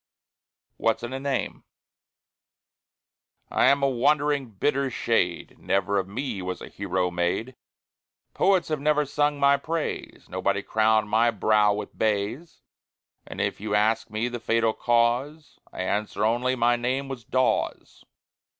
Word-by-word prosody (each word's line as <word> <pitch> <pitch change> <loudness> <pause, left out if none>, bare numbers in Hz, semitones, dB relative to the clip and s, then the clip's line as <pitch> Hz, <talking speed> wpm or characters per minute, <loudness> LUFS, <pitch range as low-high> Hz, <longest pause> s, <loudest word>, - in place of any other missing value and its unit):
WHAT'S 115 +1 0
IN 120 +2 -5
A 135 - -3
NAME? 135 -2 -3 1.9
I - - +3
am 140 0 +3
a - - +5
wandering, 140 +1 +1
bitter 135 +6 0
shade; - - -1
Never 100 +1 0
of 95 - -3
me 115 0 -4
was 90 0 -4
a - - -9
hero 95 -2 -2
made; 90 +8 -2 0.8
Poets 185 -3 +2
have 155 -2 -1
never 150 +1 +2
sung 145 +1 0
my 140 0 +5
praise, 160 +3 -4
Nobody 100 +2 -1
crowned 110 -1 +2
my 115 +3 +3
brow 105 -1 +3
with 105 - -6
bays; 110 +9 -2 0.6
And - - -8
if - - -2
you 105 0 -1
ask 110 +3 +1
me 110 +3 -2
the 120 0 -5
fatal 115 -1 +1
cause, 120 +7 0
I 95 - -4
answer 105 +2 -1
only, 120 +3 +1
"My 120 0 +3
name 130 +3 -2
was 130 -3 -7
Dawes." 130 +3 -1
120 Hz, 140 wpm, -25 LUFS, 105-140 Hz, 1.9 s, a